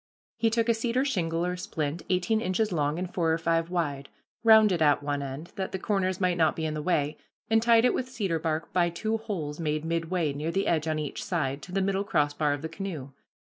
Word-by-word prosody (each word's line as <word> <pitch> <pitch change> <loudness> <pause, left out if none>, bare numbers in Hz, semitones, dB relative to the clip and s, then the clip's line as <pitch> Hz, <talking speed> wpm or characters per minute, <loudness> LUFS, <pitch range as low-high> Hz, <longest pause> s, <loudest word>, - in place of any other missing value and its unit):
He 225 0 +2
took 230 +1 +1
a 230 - +4
cedar 240 +4 0
shingle 170 -9 0
or 180 0 -1
splint 160 -3 -3
eighteen 185 +4 +1
inches 210 +3 0
long 150 -2 0
and 180 0 -4
four 165 -3 +1
or 160 - +2
five 165 0 0
wide, 145 -6 -2 0.3
rounded 215 -6 +6
at 145 -2 +4
one 145 0 -1
end, 140 +4 -6
that 190 -1 -3
the - - 0
corners 190 -2 0
might 180 -2 +1
not 160 -2 +3
be 160 - -3
in 155 - -1
the 155 - -3
way, 150 -2 0 0.3
and 225 0 +5
tied 230 0 +5
it - - +4
with 255 - -2
cedar 200 -10 -1
bark 160 0 -2
by 175 -1 +3
two 220 +6 -2
holes 175 -10 -5
made 155 -1 -1
midway, 165 -1 -1
near 150 +3 -3
the 195 +3 0
edge 160 -5 +1
on 155 -1 0
each 150 -2 -4
side, 150 -7 -1
to 180 - -10
the 195 +1 0
middle 195 0 0
crossbar 145 -5 +1
of 145 +1 -5
the - - -1
canoe. 165 -6 -5
170 Hz, 230 wpm, -28 LUFS, 155-195 Hz, 0.3 s, rounded